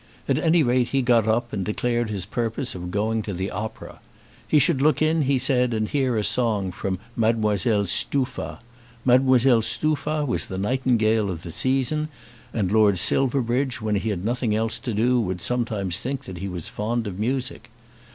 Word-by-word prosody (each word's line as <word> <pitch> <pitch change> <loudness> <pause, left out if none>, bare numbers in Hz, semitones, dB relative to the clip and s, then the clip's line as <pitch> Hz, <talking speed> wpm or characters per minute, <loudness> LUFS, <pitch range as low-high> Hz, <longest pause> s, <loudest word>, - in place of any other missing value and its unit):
At - - +2
any 165 -1 +3
rate 125 -1 +2
he 135 0 0
got 120 -3 +3
up 120 +2 0
and 100 -3 -2
declared 120 +3 -1
his 100 -4 -3
purpose 115 +5 -2
of 90 -1 -6
going 110 +3 0
to 100 -1 -5
the 95 +2 -3
opera. 110 +3 -6 0.5
He 155 - +3
should 135 -1 +3
look 150 -1 +3
in, 155 +1 +2
he 140 -1 +2
said, 125 -2 +1
and 110 -1 0
hear 130 -2 0
a 105 - 0
song 110 -4 +1
from 95 +1 -3 0.2
Mdlle 110 -2 +1
Stuffa. 130 +8 -1 0.5
Mdlle 130 -2 +4
Stuffa 155 +2 -1
was 125 - 0
the 95 - -5
nightingale 110 -1 +1
of 85 -3 -5
the 85 - -7
season, 135 - 0 0.4
and 100 -5 -1
Lord 105 -3 +4
Silverbridge, 125 +4 +1
when 110 -1 -2
he 110 +3 -2
had 95 -2 -3
nothing 120 -2 0
else 110 +1 -1
to 120 - -4
do, 120 +3 +2
would 95 -4 -3
sometimes 110 -5 -1
think 135 +1 -4
that 90 -2 -8
he 100 - -4
was 90 -4 -6
fond 115 +2 -2
of 100 -2 -6
music. 125 +1 -2
115 Hz, 180 wpm, -24 LUFS, 105-130 Hz, 0.5 s, Mdlle